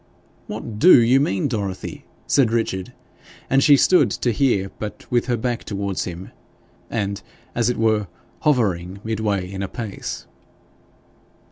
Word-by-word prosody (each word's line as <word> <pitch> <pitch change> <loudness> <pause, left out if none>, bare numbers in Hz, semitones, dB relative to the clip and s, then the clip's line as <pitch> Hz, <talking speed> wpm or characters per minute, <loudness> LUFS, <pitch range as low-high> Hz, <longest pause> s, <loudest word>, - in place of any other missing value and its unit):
'What 105 -2 -6
DO 180 +1 +8
you 120 +3 +4
mean, 100 -3 0
Dorothy?' 100 -7 -4 0.2
said 135 -5 +3
Richard; 110 -5 -1 0.6
and 135 0 +4
she 145 -1 +7
stood 180 +6 +4
to 120 - -1
hear, 105 -6 +1
but 105 -1 -6
with 120 +1 +1
her 120 -2 +1
back 120 +1 -2
towards 100 -2 -3
him, 90 +1 -7 0.6
and, 100 -3 -2 0.3
as 120 0 +1
it 125 - -1
were, 110 -2 +2 0.3
hovering 100 - 0
midway 105 -4 -1
in 95 +1 -6
a 100 - -2
pace. 105 0 -6
110 Hz, 140 wpm, -22 LUFS, 95-120 Hz, 0.6 s, DO